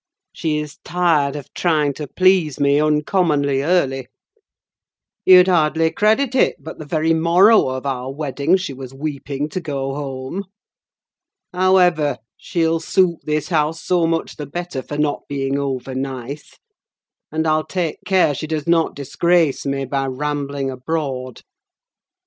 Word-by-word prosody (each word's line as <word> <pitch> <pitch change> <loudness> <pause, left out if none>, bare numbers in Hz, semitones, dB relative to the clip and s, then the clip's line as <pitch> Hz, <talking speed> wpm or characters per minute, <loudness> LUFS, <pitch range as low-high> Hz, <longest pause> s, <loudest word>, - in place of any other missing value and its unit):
She 155 -3 -1
is 150 0 -6
tired 165 -6 +1
of 145 -3 -9
trying 155 -5 +1
to 150 +2 -6
please 185 -4 +2
me 140 +1 +3
uncommonly 150 -2 +1
early. 135 -6 0 1.2
You'd 185 0 +8
hardly 160 -2 +2
credit 225 +5 +2
it, 260 - +3
but 160 - -10
the 155 - -8
very 160 +1 +1
morrow 175 +5 +5
of 130 +1 -4
our 130 -1 -3
wedding 145 +4 0
she 180 -7 -5
was 130 0 -9
weeping 145 0 -4
to 185 - -4
go 135 -4 -3
home. 135 +6 -5 1.1
However, 180 -6 +3 0.2
she'll 165 -1 0
suit 170 +1 +1
this 150 -1 -1
house 160 -1 0
so 175 -2 +2
much 165 0 -2
the 150 -2 -6
better 175 -2 -5
for 145 - -7
not 150 -1 -1
being 140 0 -1
over 135 -1 -3
nice, 135 +2 -6 0.7
and 160 +1 -1
I'll 155 0 +2
take 175 -4 -2
care 185 -6 +3
she 155 - -5
does 155 -2 -3
not 170 -1 +2
disgrace 155 +2 +1
me 135 0 -1
by 135 +1 -2
rambling 140 0 -3
abroad." 130 -2 -4
150 Hz, 145 wpm, -20 LUFS, 140-170 Hz, 1.2 s, You'd